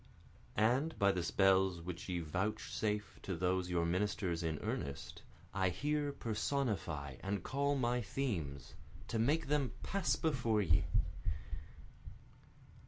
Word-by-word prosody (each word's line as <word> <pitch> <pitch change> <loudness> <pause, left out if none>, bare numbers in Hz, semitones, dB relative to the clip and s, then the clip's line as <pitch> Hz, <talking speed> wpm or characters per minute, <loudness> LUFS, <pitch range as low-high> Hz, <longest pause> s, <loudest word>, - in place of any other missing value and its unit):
And 125 +9 +3
by 100 0 +5
the 90 -2 -1
spells 95 +2 +4
which 90 +2 -6
ye 90 -1 0
vouchsafe 105 +4 -2
to 95 - -3
those 90 +1 +1
your 85 -1 +2
ministers 90 -1 0
in 80 -2 -1
earnest, 70 -1 -4 0.3
I 95 -2 +2
here 145 - 0
personify 105 - -1
and 100 0 -2
call 140 +1 +1
my 125 -2 +1
themes, 85 - -3 0.4
to 115 - 0
make 150 +8 +3
them 140 -6 +1
pass 195 -2 +1
before 120 -9 +1
ye. 80 -3 +4
100 Hz, 120 wpm, -36 LUFS, 85-125 Hz, 0.4 s, by